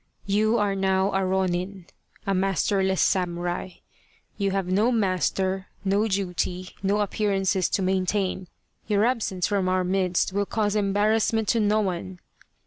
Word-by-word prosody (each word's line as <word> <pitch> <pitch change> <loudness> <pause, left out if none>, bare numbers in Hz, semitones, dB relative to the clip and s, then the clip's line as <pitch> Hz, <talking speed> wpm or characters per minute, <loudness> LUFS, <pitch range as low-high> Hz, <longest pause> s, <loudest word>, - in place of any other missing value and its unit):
You 215 +3 +2
are 205 -1 +1
now 190 0 +1
a 195 0 +1
ronin 185 0 -1 0.4
[a 195 - 0
masterless 190 0 +1
samurai], 175 0 -1 0.6
you 200 -1 0
have 195 -1 -1
no 200 +7 +2
master, 190 -2 0 0.2
no 200 +3 +2
duty, 185 -2 -2
no 200 +2 +1
appearances 195 -2 0
to 195 - 0
maintain. 190 0 0 0.4
Your 210 0 +2
absence 220 -7 0
from 195 -3 0
our 185 0 +1
midst 185 0 0
will 200 0 0
cause 210 -2 0
embarrassment 215 +2 +1
to 230 - +3
no 215 0 +2
one. 185 -1 -3
195 Hz, 135 wpm, -25 LUFS, 185-205 Hz, 0.6 s, to